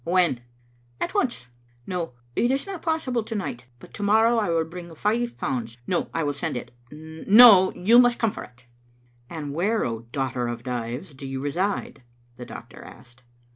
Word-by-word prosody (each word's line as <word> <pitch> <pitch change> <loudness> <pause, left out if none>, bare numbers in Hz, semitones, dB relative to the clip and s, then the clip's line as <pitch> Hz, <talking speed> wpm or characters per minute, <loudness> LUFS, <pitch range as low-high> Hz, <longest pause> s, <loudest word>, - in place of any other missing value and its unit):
"When?" 170 -8 +2 0.6
"At - - -2
once. 240 - -1 0.4
No, 175 -6 -4 0.2
it 240 - +2
is 270 +1 0
not 390 -4 -7
possible 315 -8 -1
to 220 +1 -6
night, 125 - -5
but - - -16
to - - -8
morrow 220 +3 +4
I 210 - -1
will 165 -1 +2
bring 170 0 -9
five 235 +7 -1
pounds; 115 -3 -3
no, 175 - -1
I 165 - -1
will 145 -1 -1
send 140 -2 -3
it; - - -8 0.2
no, 185 - +6
you 225 +7 +5
must 245 -1 +4
come 225 -2 +1
for - - -8
it. 125 0 -17 0.3
" 120 0 -35
"And 150 -4 -6
where, 205 +8 0
O 115 -1 -3
daughter 130 -2 -2
of 120 0 -5
Dives, 125 +6 -5
do 135 0 -9
you 135 0 -4
reside?" 175 +8 -2 0.3
the 125 - -9
doctor - - -11
asked. 120 0 -15
165 Hz, 185 wpm, -24 LUFS, -, 0.6 s, no